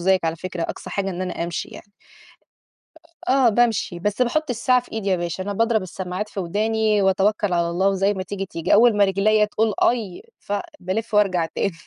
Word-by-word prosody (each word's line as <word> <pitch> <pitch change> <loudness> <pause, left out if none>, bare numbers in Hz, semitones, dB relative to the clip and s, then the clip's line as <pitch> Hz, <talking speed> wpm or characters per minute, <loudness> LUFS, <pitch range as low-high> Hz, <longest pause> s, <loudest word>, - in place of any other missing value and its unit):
زيِّك 185 0 +2
على 165 0 -1
فكرة 180 0 -5
أقصى 185 - -6
حاجة 195 +1 -2
إن 185 0 -4
أنا 180 -2 -3
أمشي 170 0 -4
يعني. 200 - -13 1.0
أ 325 -2 -9
آه 265 -2 +5
بامشي. 225 -5 +1
بس 205 +6 0
باحُط 310 +4 0
الساعة 250 +2 +2
في 245 - -19
إيدي 220 -3 -3
يا 190 - +2
باشا. 175 +1 -3
أنا 205 +2 -3
باضرب 225 +1 +1
السماعات 185 +2 -5
في 205 - -5
وداني 215 +3 +1
وأتوكّل 195 +1 +1
على 170 -1 +1
الله 185 +3 +1
وزي 195 +1 +1
ما 190 - -3
تيجي، 195 +1 -5
تيجي. 165 -3 0
أول 225 0 +5
ما 205 - +5
رجليّا 205 +2 +3
تقول 215 0 0
آي 220 -7 0 0.2
ف - - -8 0.3
بالِف 210 +5 -3
وارجع 185 -5 +3
تاني. 190 +4 -2
200 Hz, 200 wpm, -22 LUFS, 185-220 Hz, 1.0 s, آه